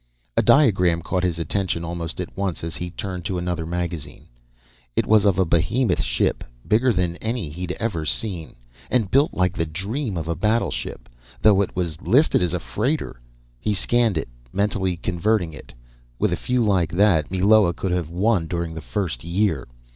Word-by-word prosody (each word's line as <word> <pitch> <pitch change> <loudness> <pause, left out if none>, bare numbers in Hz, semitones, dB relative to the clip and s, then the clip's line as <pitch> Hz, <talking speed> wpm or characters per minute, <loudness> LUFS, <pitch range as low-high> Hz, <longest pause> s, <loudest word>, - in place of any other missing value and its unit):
A - - +4
diagram 90 - +4
caught 90 +1 -1
his 90 -3 0
attention 85 0 -1
almost 85 -1 -5
at 90 - -5
once 95 -4 -2
as 80 -1 -4
he 90 +3 -4
turned 90 -1 -5
to 90 +1 -2
another 90 -2 -2
magazine. 85 -4 -4 0.7
It - - +2
was 110 -1 +4
of 100 -3 +3
a 95 - +3
behemoth 85 +10 +1
ship, - - 0 0.2
bigger 120 +4 +3
than 90 -4 0
any 110 -6 -3
he 80 +5 -9
had 90 0 -2
ever 100 -8 -2
seen, 85 0 -2 0.3
and 115 -6 +1
built 140 +4 +3
like 90 -1 +2
the 85 -2 -1
dream 100 - -3
of 80 -1 -4
a 85 - 0
battleship, 105 - -1 0.4
though 105 -2 +6
it 100 - -3
was 85 -2 -3
listed 140 - +4
as 90 -1 +1
a - - -1
freighter. 115 - -2 0.4
He 105 - 0
scanned 115 -1 +2
it, 80 - -3 0.2
mentally 95 -3 0
converting 90 0 0
it. 65 - -11 0.5
With - - +1
a - - +2
few 125 -2 0
like 90 -6 +2
that, 90 -5 +3
Meloa 95 0 +4
could 95 +1 -3
have 90 -3 -1
won 90 0 +1
during 85 -1 -3
the 80 - -6
first 75 -1 -3
year. 85 - 0
90 Hz, 185 wpm, -23 LUFS, 85-105 Hz, 0.7 s, though